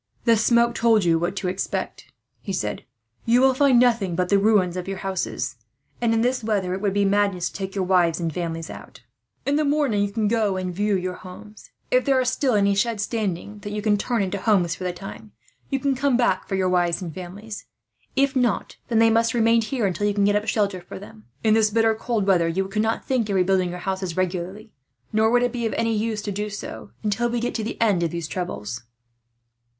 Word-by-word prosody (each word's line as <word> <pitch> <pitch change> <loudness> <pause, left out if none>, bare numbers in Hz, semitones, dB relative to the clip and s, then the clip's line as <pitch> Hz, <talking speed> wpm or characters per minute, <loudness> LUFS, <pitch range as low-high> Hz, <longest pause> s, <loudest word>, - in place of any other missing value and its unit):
"The 230 -1 +5
smoke 235 +2 +3
told 225 -3 +3
you 165 -1 +3
what 175 +3 -2
to 195 -1 -3
expect," 185 +2 -4 0.3
he 195 - -5
said. 105 - -3 0.4
"You 235 +2 +5
will 265 0 +5
find 265 -2 +4
nothing 230 -8 +2
but 180 +1 0
the 200 - +4
ruins 195 -4 +3
of 180 0 -4
your 195 0 -3
houses 190 -9 -3 0.4
and, 235 -1 +2
in 225 0 +2
this 250 0 0
weather, 200 -4 0
it 190 - -4
would 200 -2 0
be 205 0 +3
madness 195 -3 +1
to - - -19
take 195 -1 -5
your 195 - 0
wives 180 -3 +2
and 165 -2 -2
families 165 -1 -4
out. - - -12 0.4
In 280 +1 +2
the 305 - +2
morning 280 -8 +1
you 200 - -2
can 215 0 0
go 210 -3 +1
and 185 -1 -3
view 205 +2 +1
your 185 0 -2
homes. 185 +4 -12 0.2
If - - +4
there 270 -2 +3
are 255 - +1
still 255 -1 +1
any 200 -1 +3
sheds 210 +1 0
standing, 210 -2 -3
that 205 0 -7
you 210 0 -3
can 210 -1 +3
turn 225 +1 0
into 195 +1 -3
houses 190 -5 +2
for 185 - -6
the 180 - 0
time, 110 -10 -10 0.4
you 275 - 0
can 275 +1 +1
come 270 -1 +1
back 235 -7 +1
for 195 - -2
your 190 -1 +1
wives 175 -2 +1
and 165 -3 -6
families. 200 +5 -8 0.5
If 275 0 +2
not, 245 -5 0
they 225 -1 +4
must 230 +1 +2
remain 230 0 +4
here 220 -4 -1
till 205 +5 -1
you 205 - 0
can 200 -1 +3
get 205 0 +3
up 210 +1 0
shelter 200 -4 0
for 175 - -9
them. 150 - -13 0.2
In 220 -1 +4
this 220 -1 +4
bitter 225 +1 +3
cold 220 -2 -2
weather, 180 -4 +3
you 190 +3 -1
could 210 +2 -1
not 220 +1 -1
think 245 -5 0
of 200 - 0
rebuilding 185 -1 +2
your 175 - -5
houses 190 -1 -3
regularly; 185 +4 -3 0.4
nor 220 +1 +3
would 245 +1 +3
it 245 - +1
be 235 -2 -2
any 230 0 +1
use 215 0 -2
to 205 - -3
do 210 +2 -3
so, 110 - -7
until 220 +3 0
we 240 0 -1
get 240 +1 -2
to 225 - -2
the 220 - -5
end 205 -6 +3
of 170 - +1
these 170 -1 -4
troubles. 125 - -5
205 Hz, 230 wpm, -23 LUFS, 185-230 Hz, 0.5 s, The